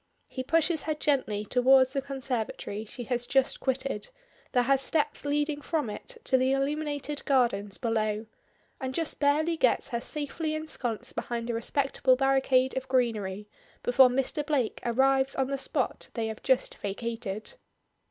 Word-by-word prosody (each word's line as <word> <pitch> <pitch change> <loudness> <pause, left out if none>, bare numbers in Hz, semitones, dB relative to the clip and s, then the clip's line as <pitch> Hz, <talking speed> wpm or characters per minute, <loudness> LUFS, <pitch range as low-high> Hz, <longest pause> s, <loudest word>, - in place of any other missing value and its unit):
He 260 - -5
pushes 325 +3 +2
her 310 - +1
gently 260 -9 0
towards 260 +3 +4
the 275 - 0
conservatory 250 -6 -3
she 245 +3 -7
has 245 0 -2
just 270 0 +2
quitted, 260 -5 -2 0.4
that 245 - +3
has 270 +1 +3
steps 295 +1 0
leading 295 +1 0
from 295 -8 -1
it 485 - -8
to 260 - +3
the 260 +1 +2
illuminated 290 +1 -2
gardens 235 -8 +1
below, 215 -2 -1 0.5
and 260 -1 -4
just 330 -2 -2
barely 310 +3 +2
gets 255 -1 +2
her 235 -3 -2
safely 310 +3 -3
ensconced 250 -6 -3
behind 235 0 -3
a - - -3
respectable 260 +2 +1
barricade 265 -1 +2
of 260 0 -3
greenery 215 -6 0 0.4
before 250 +1 +6
Mr. 270 +4 0
Blake 285 -6 -1
arrives 265 +3 +2
on 265 0 0
the 275 - 0
spot - - -2
they 230 -2 -1
have 220 0 -5
just 260 -1 +1
vacated. 220 - -4
260 Hz, 150 wpm, -28 LUFS, 235-285 Hz, 0.5 s, before